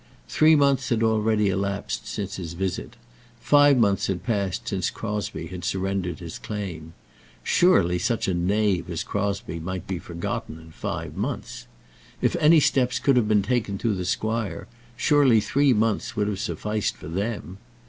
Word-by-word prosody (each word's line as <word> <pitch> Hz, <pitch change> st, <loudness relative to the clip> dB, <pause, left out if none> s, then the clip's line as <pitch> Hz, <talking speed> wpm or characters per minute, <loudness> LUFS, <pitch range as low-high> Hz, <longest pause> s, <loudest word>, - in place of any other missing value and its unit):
Three 155 Hz, +1 st, +5 dB
months 140 Hz, -3 st, +2 dB
had 115 Hz, -3 st, +1 dB
already 110 Hz, -2 st, +2 dB
elapsed 100 Hz, +2 st, -2 dB
since 105 Hz, -2 st, -4 dB
his 85 Hz, -3 st, -6 dB
visit. 95 Hz, +1 st, -4 dB, 0.4 s
Five 145 Hz, -1 st, +5 dB
months 100 Hz, -4 st, +2 dB
had 95 Hz, -2 st, -2 dB
passed 105 Hz, 0 st, -2 dB
since 95 Hz, -5 st, -1 dB
Crosbie 105 Hz, -6 st, -4 dB
had 90 Hz, +1 st, -8 dB
surrendered 95 Hz, -2 st, -2 dB
his 85 Hz, -3 st, -8 dB
claim. 90 Hz, -7 st, -6 dB, 0.5 s
Surely 90 Hz, -, +3 dB
such 115 Hz, +4 st, 0 dB
a 95 Hz, -, +1 dB
knave 95 Hz, 0 st, +1 dB
as 85 Hz, -3 st, -3 dB
Crosbie 100 Hz, -3 st, -3 dB
might 95 Hz, +1 st, -5 dB
be 95 Hz, -2 st, -3 dB
forgotten 85 Hz, -2 st, -5 dB
in 80 Hz, 0 st, -14 dB
five -, -, -5 dB
months! -, -, -4 dB, 0.5 s
If -, -, +1 dB
any 155 Hz, +2 st, +6 dB
steps 130 Hz, -3 st, +2 dB
could 140 Hz, -, +2 dB
have 120 Hz, -4 st, +3 dB
been 105 Hz, -2 st, +3 dB
taken 105 Hz, -2 st, -1 dB
through 115 Hz, +1 st, 0 dB
the 90 Hz, -2 st, -3 dB
squire, 110 Hz, +3 st, -2 dB, 0.3 s
surely 135 Hz, -6 st, +4 dB
three 135 Hz, +7 st, +2 dB
months 110 Hz, -2 st, 0 dB
would 105 Hz, -1 st, 0 dB
have 105 Hz, -2 st, -2 dB
sufficed 105 Hz, 0 st, -2 dB
for -, -, -10 dB
them! 100 Hz, +1 st, -4 dB
100 Hz, 160 wpm, -25 LUFS, 90-115 Hz, 0.5 s, any